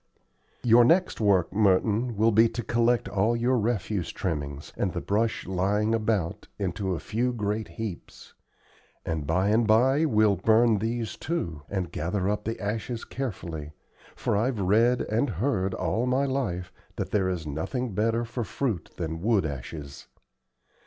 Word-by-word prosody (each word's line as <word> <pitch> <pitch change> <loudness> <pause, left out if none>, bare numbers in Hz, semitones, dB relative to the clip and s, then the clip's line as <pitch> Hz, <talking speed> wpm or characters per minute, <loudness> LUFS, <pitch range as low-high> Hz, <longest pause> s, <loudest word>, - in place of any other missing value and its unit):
"Your 120 0 +7
next 170 +2 +3
work, 95 -4 +3
Merton, 105 +3 +2
will 110 +2 +4
be 115 +2 +5
to 120 +1 -4
collect 120 +1 +2
all 105 +4 +1
your 120 +2 +2
refuse 105 -4 -1
trimmings, 75 -5 -4
and - - -1
the - - -2
brush 110 +2 0
lying 100 +4 +1
about, 110 -6 -1
into 95 0 -2
a - - -4
few 120 +3 -1
great 105 -1 -2
heaps; 110 -6 -8 0.7
and 80 -3 -3
by 90 +5 +2
and 110 +1 +3
by 130 +8 +4
we'll 110 - +3
burn 110 +2 +4
these, 115 +1 -2
too, 85 - -3
and 95 -4 -3
gather 90 +5 -2
up 105 +1 -1
the 115 +1 -3
ashes 110 +3 -3
carefully, 85 - -5 0.4
for - - -1
I've 115 +2 0
read 115 +6 +3
and 115 +6 0
heard 95 - -1
all 120 +3 -1
my 130 +2 +2
life 120 -11 -2 0.2
that - - -4
there 95 -3 +2
is 90 -4 -3
nothing 95 - -3
better 115 +4 +1
for 120 +1 -4
fruit 110 -5 -3
then 80 -1 -4
wood 105 -3 +2
ashes. 70 0 -7
105 Hz, 155 wpm, -27 LUFS, 95-115 Hz, 0.7 s, Your